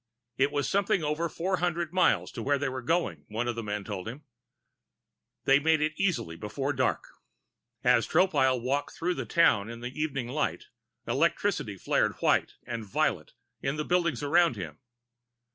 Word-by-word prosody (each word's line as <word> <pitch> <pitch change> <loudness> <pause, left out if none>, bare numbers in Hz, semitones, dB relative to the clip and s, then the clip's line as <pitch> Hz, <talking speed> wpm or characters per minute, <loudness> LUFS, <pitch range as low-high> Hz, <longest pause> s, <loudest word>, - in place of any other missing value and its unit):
It 140 +2 +2
was 145 -1 0
something 195 -3 +1
over 150 +3 -1
four 185 +4 -1
hundred 170 -1 -1
miles 185 0 +3
to 120 - -6
where 140 +4 +2
they 140 0 -1
were 130 0 -5
going, 165 +8 0
one 115 +3 -2
of 120 - 0
the 115 - -3
men 105 -1 -3
told 100 -1 -5
him. 130 +7 -7 1.2
They 135 +1 +6
made 160 +1 +3
it 155 +1 0
easily 170 - -1
before 135 +10 -3
dark. 130 -1 0 0.8
As - - +4
Tropile 145 -8 +3
walked 140 +4 -2
through 180 +2 0
the - - -5
town 115 -11 +3
in 115 0 -8
the 120 +1 -5
evening 140 -5 -2
light, 145 +5 -2 0.4
electricity - - 0
flared - - +1
white - - +1
and 115 -2 -4
violet 100 - -1 0.3
in 135 +2 -1
the 150 0 -3
buildings 170 -7 +1
around 165 -1 +4
him. 80 -6 -7
145 Hz, 170 wpm, -28 LUFS, 120-165 Hz, 1.2 s, They